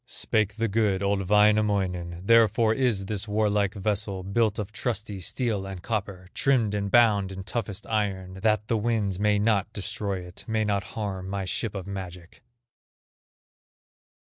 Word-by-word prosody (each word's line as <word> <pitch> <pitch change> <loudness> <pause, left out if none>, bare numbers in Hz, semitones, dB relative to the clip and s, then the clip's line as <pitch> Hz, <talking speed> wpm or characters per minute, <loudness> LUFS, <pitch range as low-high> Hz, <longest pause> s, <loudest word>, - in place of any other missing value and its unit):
Spake 105 -2 0
the 115 +1 0
good, 100 -2 +1
old 100 -2 0
Wainamoinen: 100 -5 +2
"Therefore 115 0 +5
is 115 -6 +1
this 105 +1 -2
warlike 105 -1 +1
vessel 100 -1 -2
Built 105 +2 +1
of 105 -2 -4
trusty 110 -2 -3
steel 105 0 -1
and 95 -2 -7
copper, 100 -4 -3
Trimmed 120 -7 +2
and 100 -1 -1
bound 105 -4 +4
in 95 0 -6
toughest 105 0 -4
iron, 95 -4 -2
That 110 0 +1
the 115 - +1
winds 105 -4 0
may 105 0 +3
not 105 -1 +1
destroy 100 -1 -3
it, 90 0 -9
May 110 -1 0
not 100 -2 0
harm 95 -3 -3
my 100 -1 -3
ship 105 +3 -3
of 95 -2 -5
magic." 90 -3 -8
105 Hz, 150 wpm, -26 LUFS, 95-110 Hz, -, Therefore